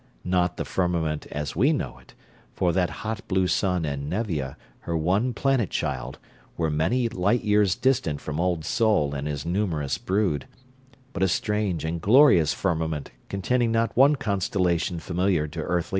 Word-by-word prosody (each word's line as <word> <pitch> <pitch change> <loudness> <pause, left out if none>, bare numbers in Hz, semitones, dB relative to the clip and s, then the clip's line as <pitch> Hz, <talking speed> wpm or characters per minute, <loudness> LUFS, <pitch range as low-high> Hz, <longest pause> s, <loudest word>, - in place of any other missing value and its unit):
Not 90 -1 0
the - - -3
firmament 85 -4 -1
as 75 -2 -4
we 130 - +4
know 65 - -3
it 60 - -20 0.4
for 90 -2 +1
that 90 -1 +1 0.2
hot 110 -1 -4
blue 95 -1 +2
sun 90 -2 +1
and 70 0 -3
Nevia, 85 - -2 0.2
her 85 - -3
one 95 +10 +1
planet 125 - +1
child, - - -3 0.4
were 80 -2 0
many 85 +12 +1
light 110 +1 0
years 105 -3 +3
distant 120 - +1
from 75 +1 -5
Old 85 -3 0
Sol 105 -11 +2
and 70 +1 -3
his 70 -1 -4
numerous 85 -6 -1
brood 95 -8 0 0.7
but - - -4
a 95 - +4
strange 100 -2 -1
and 80 +1 -3
glorious 100 - +6
firmament 80 -5 -2 0.2
containing 115 +4 0
not 115 0 0
one 140 +4 +6
constellation 90 - 0
familiar 90 -2 0
to 80 +2 -7
earthly 90 +2 0
eyes. 85 - -11
90 Hz, 165 wpm, -25 LUFS, 80-105 Hz, 0.7 s, glorious